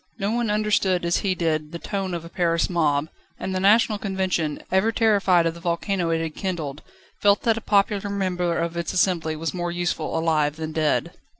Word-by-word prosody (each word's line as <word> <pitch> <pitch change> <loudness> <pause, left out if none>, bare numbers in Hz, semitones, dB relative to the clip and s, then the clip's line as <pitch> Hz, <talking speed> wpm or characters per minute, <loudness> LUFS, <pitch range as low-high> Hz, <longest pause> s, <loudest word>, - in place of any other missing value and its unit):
No 200 -1 -1
one 235 -1 0
understood 210 -4 +1
as 170 - +2
he 190 -2 0
did 155 -3 -1
the - - -3
tone 190 0 -3
of 165 -1 -6
a - - -7
Paris 170 -1 0
mob; 155 -4 +1 0.3
and 190 - -3
the 185 - 0
National 210 +2 +4
Convention, 185 -6 -1
ever 190 +4 +3
terrified 200 -6 +3
of 165 - 0
the 170 - -11
volcano 170 +1 -1
it 165 0 +1
had 160 -1 -3
kindled, 155 -7 -4 0.4
felt 205 0 +4
that 225 -1 +3
a 225 - -5
popular 205 -1 +1
member 180 -3 -1
of 170 0 -2
its 170 +1 -3
assembly 175 -4 +1
was 160 +1 -3
more 175 -1 -2
useful 175 -2 -2
alive 155 -2 +1
than 160 0 -5
dead. 155 -1 0
175 Hz, 200 wpm, -24 LUFS, 165-200 Hz, 0.4 s, National